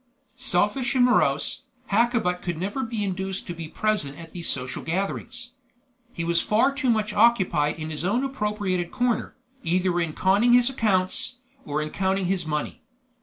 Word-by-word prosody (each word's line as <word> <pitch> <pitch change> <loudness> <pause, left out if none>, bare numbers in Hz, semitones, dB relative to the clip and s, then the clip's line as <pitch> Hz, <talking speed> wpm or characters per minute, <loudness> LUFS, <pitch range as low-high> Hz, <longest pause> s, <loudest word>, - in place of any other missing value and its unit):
Selfish 245 +2 0
and 250 -1 +5
morose, 250 - +2 0.3
Hakkabut 220 -5 +2
could 175 -3 -3
never 200 +10 -2
be 225 -2 -3
induced 190 0 -3
to 175 - -5
be 165 -1 -7
present 160 -7 -1
at 165 -1 -11
these 170 -2 -1
social 130 0 -2
gatherings. 200 +7 -3 0.6
He 170 - -4
was 170 0 +2
far 235 +6 +2
too 275 -2 -1
much 215 -2 +1
occupied 190 -10 +3
in 155 0 -5
his 155 0 -3
own 215 +8 +1
appropriated 210 -8 -1
corner, 245 -2 -1 0.3
either 180 +1 +1
in 165 -3 -1
conning 200 +8 +3
his 245 +1 +5
accounts, 215 +1 +1 0.3
or 150 +1 -1
in 155 - -6
counting 190 0 0
his 180 -3 -1
money. 150 -1 -3
195 Hz, 165 wpm, -25 LUFS, 170-235 Hz, 0.6 s, and